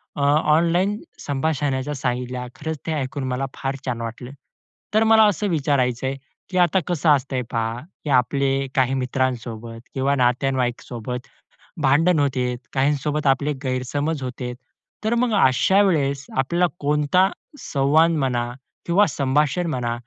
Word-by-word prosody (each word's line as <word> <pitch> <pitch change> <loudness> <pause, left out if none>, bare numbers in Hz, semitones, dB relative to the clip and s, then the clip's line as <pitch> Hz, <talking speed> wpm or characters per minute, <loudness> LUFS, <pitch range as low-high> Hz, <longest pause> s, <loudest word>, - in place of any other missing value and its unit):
अ, 145 - -3
online 165 +7 +3 0.2
संभाषणाच्या 145 -1 -1
सांगितल्या 125 0 -3
खरंच 160 +1 -4
ते - - 0
ऐकून 140 -1 -3
मला 130 +2 -1
फार 135 0 -3
छान 120 -3 -2
वाटलं. 115 +3 -6 0.6
तर 220 +1 +4
मला 220 0 +6
असं 205 +1 0
विचारायच 135 -6 +1
आहे, 135 +1 -1 0.3
की 185 - -3
आता 175 +1 +4
कसं 170 -2 +1
असतंय 135 -2 +2
पहा, 115 0 -1 0.3
की 150 - -4
आपले 135 +1 +2
काही 130 0 +2
मित्रांसोबत 125 -3 -2
किंवा 140 +1 +1
नातेवाईकांसोबत 125 -1 -1 0.5
भांडण 150 +5 +4
होते, 125 -3 0 0.2
काहींसोबत 145 +2 0
आपले 140 +2 +2
गैरसमज 135 +3 -2
होते 125 -1 -5 0.5
तर 220 +2 +1
मग 245 -2 +1
अशा 190 +10 +4
वेळेस 140 -7 +1
आपल्याला 170 +7 +2
कोणता 150 +6 +2 0.3
संवाद 150 +4 +3
म्हणा 125 -6 0 0.3
किंवा 195 +5 +4
संभाषण 145 +5 +1
म्हणा 120 -2 -1
135 Hz, 130 wpm, -22 LUFS, 125-155 Hz, 0.6 s, मला